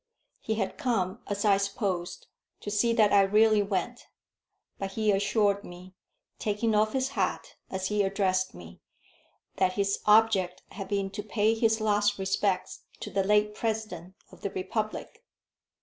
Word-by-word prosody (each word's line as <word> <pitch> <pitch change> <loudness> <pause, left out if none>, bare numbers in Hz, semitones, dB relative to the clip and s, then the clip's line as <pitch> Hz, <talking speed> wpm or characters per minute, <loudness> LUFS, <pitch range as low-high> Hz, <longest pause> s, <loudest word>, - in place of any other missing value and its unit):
He 220 - -2
had 200 +4 -3
come, 225 -7 -1
as 205 +1 -2
I 200 -2 +5
supposed, 195 -3 -3 0.4
to 205 - -5
see 230 +3 +2
that 215 -2 +4
I 200 - +7
really 210 +2 +4
went; 200 +4 -3 0.7
but 195 0 -4
he 215 0 +1
assured 200 0 +1
me, 180 +1 -12 0.5
taking 215 +1 0
off 215 +1 +2
his 265 0 0
hat - - -2 0.2
as 190 0 -3
he 210 0 +1
addressed 195 -1 0
me, 85 -1 -12 0.8
that 185 -1 +2
his 200 0 0
object 210 -4 +4
had 195 -2 -7
been 195 -1 -1
to 210 +2 -5
pay 215 +1 +1
his 225 0 +2
last 210 -1 +2
respects 195 0 -1 0.2
to - - -6
the 195 - +1
late 210 +1 +2
President 210 -6 -4 0.2
of - - -16
the 200 - -2
republic. 215 - -4
205 Hz, 155 wpm, -28 LUFS, 195-215 Hz, 0.8 s, I